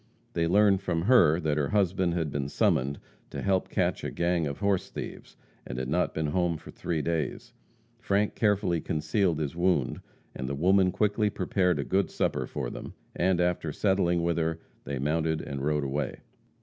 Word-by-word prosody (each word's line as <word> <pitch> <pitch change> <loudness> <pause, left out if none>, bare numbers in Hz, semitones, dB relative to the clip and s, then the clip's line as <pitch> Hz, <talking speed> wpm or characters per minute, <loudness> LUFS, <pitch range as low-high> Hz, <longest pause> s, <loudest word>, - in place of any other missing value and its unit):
They 85 0 +1
learned 100 +1 +4
from 85 -4 -1
her 90 -8 +5
that 75 -2 0
her 70 -1 0
husband 95 -3 +1
had 80 -4 -1
been 70 -1 -2
summoned 70 0 +1 0.3
to - - -6
help 95 -2 +1
catch - - 0
a - - -2
gang 85 -2 0
of 70 - -4
horse 100 -2 0
thieves, - - -8 0.3
and - - -7
had 65 0 -3
not 90 +5 0
been 80 - -1
home 85 +2 0
for - - -12
three 80 -4 -3
days. 80 -4 -2 0.5
Frank 105 -2 +1
carefully 100 -6 +1
concealed 80 +4 0
his 75 0 -3
wound, 90 +1 +1 0.3
and 65 -1 -5
the 70 - -2
woman 90 +4 +3
quickly 105 +2 +1
prepared 90 -2 +1
a - - -1
good 95 -2 +1
supper - - -1
for - - -4
them, - - -8 0.2
and, 90 0 +2
after 90 -3 0
settling 90 -1 +1
with 85 0 +1
her, 80 0 -1 0.3
they 70 - -3
mounted 80 +3 0
and 70 -2 -5
rode 75 0 +1
away. 70 +2 -3
85 Hz, 185 wpm, -28 LUFS, 75-95 Hz, 0.5 s, her